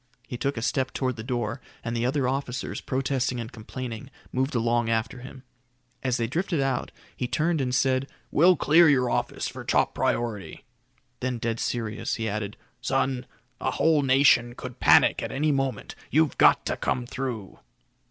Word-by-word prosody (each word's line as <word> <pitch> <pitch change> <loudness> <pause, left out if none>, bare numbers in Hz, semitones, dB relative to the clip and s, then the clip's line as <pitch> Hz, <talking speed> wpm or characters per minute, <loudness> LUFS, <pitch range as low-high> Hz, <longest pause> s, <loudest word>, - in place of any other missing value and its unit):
He - - -5
took 140 +2 -2
a 115 - -3
step 130 0 0
toward 130 -2 -1
the 110 - -7
door, 120 0 -2 0.2
and 115 0 -3
the 115 +1 +1
other 135 -1 +1
officers, 130 -1 -3
protesting 130 -1 -1
and 115 +1 -6
complaining, 120 +1 -7 0.2
moved 130 +2 -1
along 120 0 +1
after 115 +3 -1
him. 130 +1 -11 0.6
As 130 -1 0
they 115 - 0
drifted 165 +6 -1
out, 135 -1 -1 0.2
he 125 - -2
turned 160 +3 +1
and 130 - 0
said, 130 +1 +2 0.2
"We'll 180 +4 +6
clear 160 +3 +6
your 125 -4 +3
office - - -1
for - - -7
top - - +2
priority." 110 -5 -2 0.5
Then 130 -1 -2
dead 115 0 -2
serious, 115 -1 -2
he 110 -1 -3
added, 105 -1 -3 0.2
"Son, 135 -1 0 0.3
a - - 0
whole 155 +3 +3
nation 130 -3 +4
could 125 -1 -8
panic - - +5
at - - -4
any 150 +3 +1
moment. 135 -5 -2 0.2
You've 155 0 +2
got - - +6
to - - -1
come 125 - -1
through." 120 -6 -5
130 Hz, 170 wpm, -26 LUFS, 115-135 Hz, 0.6 s, We'll